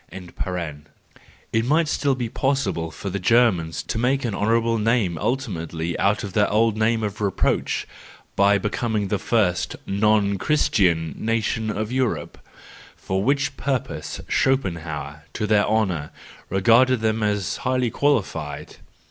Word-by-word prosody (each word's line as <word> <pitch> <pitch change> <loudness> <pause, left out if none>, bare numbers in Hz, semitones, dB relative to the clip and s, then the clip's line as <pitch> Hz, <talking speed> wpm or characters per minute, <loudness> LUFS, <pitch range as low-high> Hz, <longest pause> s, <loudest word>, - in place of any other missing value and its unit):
—It 90 +2 -6
might 155 +6 +2
still 140 -2 +1
be 125 -2 -3
pos¬ 135 +3 0
sible 80 -1 -4
for 100 - -6
the 100 - -2
Germans 95 -6 +2
to 110 - -3
make 130 +2 +1
an 115 - -2
honourable 115 +2 +1
name 110 -5 +1
ultimately 85 - -2
out 100 +2 +2
of 100 -3 -6
their 105 +1 +3
old 110 +1 +2
name 110 +1 +1
of 105 0 -4
reproach, 100 -3 0 0.5
by 100 +1 +4
becoming 105 0 -1
the 105 - 0
first 100 -6 0
non 100 -1 +2
Christian 90 - +2
nation 110 -1 -1
of 110 +1 -3
Europe; 125 - -1 0.6
for 95 +1 -2
which 140 +2 +1
purpose 135 -3 -3
Schopenhauer, 80 - -1
to 110 - -2
their 105 -1 +3
honour, 95 -9 0 0.4
regarded 115 +6 +4
them 110 0 0
as 105 -3 -1
highly 130 -3 0
qualified. 90 - -1
105 Hz, 135 wpm, -23 LUFS, 90-120 Hz, 0.6 s, by